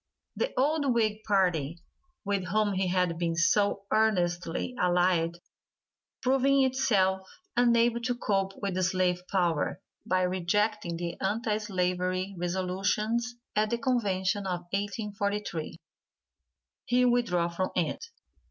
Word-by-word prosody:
The - - -1
old 285 -2 +2
Whig 215 -2 +1
party, 175 -6 +1 0.5
with 200 -2 -1
whom 205 +3 +1
he 190 0 0
had 180 -2 0
been 170 -1 0
so 200 +4 +2
earnestly 180 -2 +1
allied, 175 -1 +2 0.9
proving 270 +1 +3
itself 200 -8 +1 0.3
unable 235 -1 +3
to 245 +1 -1
cope 195 -4 0
with 200 -1 -2
the 185 - -1
slave 180 -1 +1
power, 175 -3 +1 0.2
by 185 0 +1
rejecting 185 +1 0
the 170 0 -5
anti 215 +2 0
slavery 185 -1 -1
resolutions 195 +7 -1 0.2
at 215 0 +2
the 235 - 0
convention 205 -6 0
of 180 -1 -2
1843, 205 -3 -3 1.1
he 250 0 +3
withdrew 230 -9 +2
from 185 +2 -2
it. 175 - -1
195 Hz, 115 wpm, -29 LUFS, 180-220 Hz, 1.1 s, proving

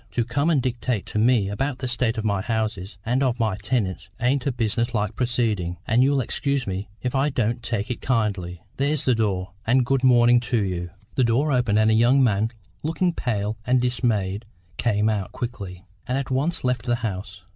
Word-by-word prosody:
To 120 - +1
come 140 +6 0
and 155 -4 +3
dictate 120 -4 -1
to 105 - -2
me 115 -3 +3
about 130 +7 -2
the 130 - -4
state 125 -1 0
of 110 - -2
my 100 -2 +1
houses 110 -4 -2
and 125 +4 +1
of 125 -3 +1
my 110 -4 +1
tenants 105 -8 -2
ain't 125 +2 +1
a - - +2
business 120 0 -1
like 105 0 -1
proceeding, 110 -8 0
and 120 +1 +3
you'll 135 +1 +3
excuse 140 +2 -1
me 95 +1 -4
if 125 - -1
I 135 +2 +2
don't 120 -2 -1
take 115 -1 -2
it 125 - -4
kindly. 100 -8 -1
There's 145 +1 0
the 130 - +4
door, 100 -4 -1 0.2
and 125 +2 +4
good 135 +1 +1
morning 120 -1 +6
to 120 -3 0
you!" 90 -2 -3 0.2
The 130 - +2
door 125 +6 +2
opened, 125 -5 +2
and 110 0 +4
a - - +4
young 120 +5 +5
man, 110 -2 +2 0.3
looking 165 +3 0
pale 110 -6 -2
and 125 +2 +3
dismayed, 115 -5 0 0.3
came 105 -2 +1
out 105 -4 -1
quickly, 100 -6 -6 0.2
and 125 - 0
at 135 -1 -3
once 145 +6 0
left 125 0 -1
the 120 - +3
house. 95 -3 -5
120 Hz, 200 wpm, -24 LUFS, 105-130 Hz, 0.3 s, morning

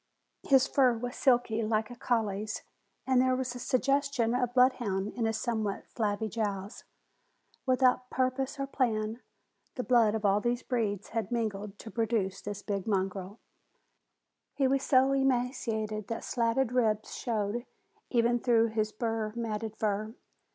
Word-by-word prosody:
His 270 -1 +6
fur 255 -5 +3
was 245 +2 -5
silky, 245 -4 +2
like 220 +1 0
a - - -7
collie's, 220 -4 -1 0.4
and 260 -1 +4
there 255 0 +3
was 255 -1 -2
a 245 - -7
suggestion 275 -1 +1
of 250 -1 0
bloodhound 235 -6 +2
in 235 - -1
his 225 0 0
somewhat 220 -5 -2
flabby 215 -1 -1
jowls. 205 -1 -4 0.8
Without 255 -1 +3
purpose 260 +2 -1
or 275 - 0
plan, 230 -4 -1 0.5
the 250 - -2
blood 230 -4 +4
of 220 -1 -2
all 200 +1 +3
these 240 +1 -1
breeds 215 -5 -2
had 225 -3 -3
mingled 210 -3 -2
to 220 - -10
produce 220 -5 -1
this 205 0 -6
big 200 -2 -3
mongrel. 195 0 -2 1.2
He 275 -2 +2
was 270 +1 +2
so 265 0 +4
emaciated 240 -5 0
that 230 - -4
slatted 235 +1 +1
ribs 220 -4 +1
showed 225 0 -2 0.4
even 240 0 +2
through 230 -2 +3
his 215 -1 -1
burr 225 -1 -2
matted 220 -2 -3
fur. 215 +1 -1
230 Hz, 145 wpm, -30 LUFS, 215-250 Hz, 1.2 s, His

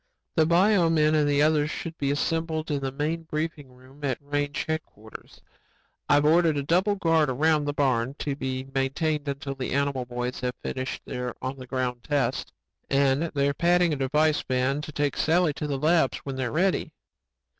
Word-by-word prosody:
"The 160 -2 +4
bio 180 +1 +4
men 155 -1 +3
and 150 -1 +3
the 145 0 +3
others 150 -1 +2
should 165 0 -5
be 140 - 0
assembled 160 +2 -1
in 145 - 0
the 135 -1 -2
main 150 +4 -2
briefing 155 -3 -4
room 130 +3 -18
at 135 -3 0
range 145 0 -2
headquarters. 135 -9 -7 0.7
I've 145 0 +4
ordered 160 0 +4
a 140 - -1
double 185 +7 +2
guard 165 -5 +2
around 150 +3 +2
the 145 - -1
barn, 130 -2 +1
to 140 -2 -2
be 130 -2 -3
maintained 145 +3 -1
until 140 0 -3
the 135 -2 -4
animal 140 -2 0
boys 125 +1 -4
have 125 0 -2
finished 130 -1 -4
their 125 -1 -4
on 130 +1 -4
the 130 - -9
ground 125 -2 -2
tests. 145 -5 -1 0.4
And 140 +2 +2
they're 140 0 +2
padding 175 +1 +3
a - - 0
device 150 +3 +2
van 130 +3 0
to 155 - -7
take 145 -1 -1
Sally 165 -1 +2
to 150 - -4
the 140 -2 -1
labs 155 0 +2
when 135 -1 -5
they're 130 -2 -2
ready. 185 +3 0
145 Hz, 185 wpm, -26 LUFS, 135-160 Hz, 0.7 s, The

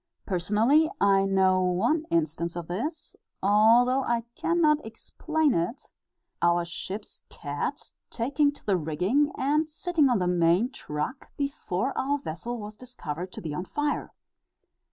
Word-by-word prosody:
Personally, 215 - +3
I 195 -1 +4
know 190 -1 +3
one 220 - +1
instance 170 +1 -1
of 175 -2 -5
this, 300 - -4 0.3
although 230 +6 +5
I 235 -2 0
cannot 310 -1 +2
explain 310 +6 -1
it, 170 +8 0
viz., - - -20 0.5
our 170 0 +3
ship's 190 +4 -6
cat - - -5 0.2
taking 280 +5 +1
to - - -14
the 195 -3 +2
rigging 180 - +1
and 300 +3 +1
sitting 315 -2 +1
on 245 - +3
the 180 - 0
main 180 +7 +2
truck 150 - -5
before 275 -4 -2
our 280 +2 0
vessel 240 - -5
was 210 -1 -8
discovered 185 -9 -6
to - - -8
be 155 -3 -4
on 175 - -3
fire. 295 +7 -2
220 Hz, 140 wpm, -27 LUFS, 180-285 Hz, 0.5 s, although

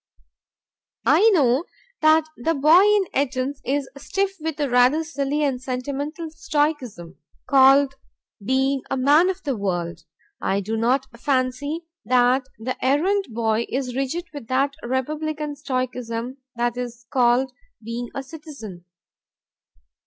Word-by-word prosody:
I 320 - +6
know 285 - +3 0.4
that 310 0 +5
the 325 +7 -1
boy 305 +6 +6
in 415 0 +4
"Etons" 270 0 -1
is 275 +2 -1
stiff 390 +5 -1
with 315 -1 -4
a 290 - +1
rather 250 +5 +4
silly 295 -2 -1
and 265 -3 0
sentimental 280 +5 -4
stoicism, 295 - -2 0.3
called 270 0 +6 0.5
being 265 +4 +1
a - - -1
man 295 +7 +5
of 380 0 -4
the 275 -3 -1
world. 175 -5 -3 0.4
I 195 +1 +1
do 215 +3 -3
not 250 +4 +1
fancy 275 +5 -1 0.2
that 250 +3 +3
the 240 +4 -5
errand 365 +10 +2
boy 225 0 0
is 255 -2 -3
rigid 275 +6 -2
with 285 -6 -8
that 275 +3 +1
republican 300 +4 -3
stoicism 255 -3 -3 0.2
that 240 0 -1
is 240 -1 -6
called 255 0 +3 0.3
being 235 +2 -5
a 275 - -3
citizen. 270 - -10
270 Hz, 130 wpm, -23 LUFS, 245-300 Hz, 0.5 s, I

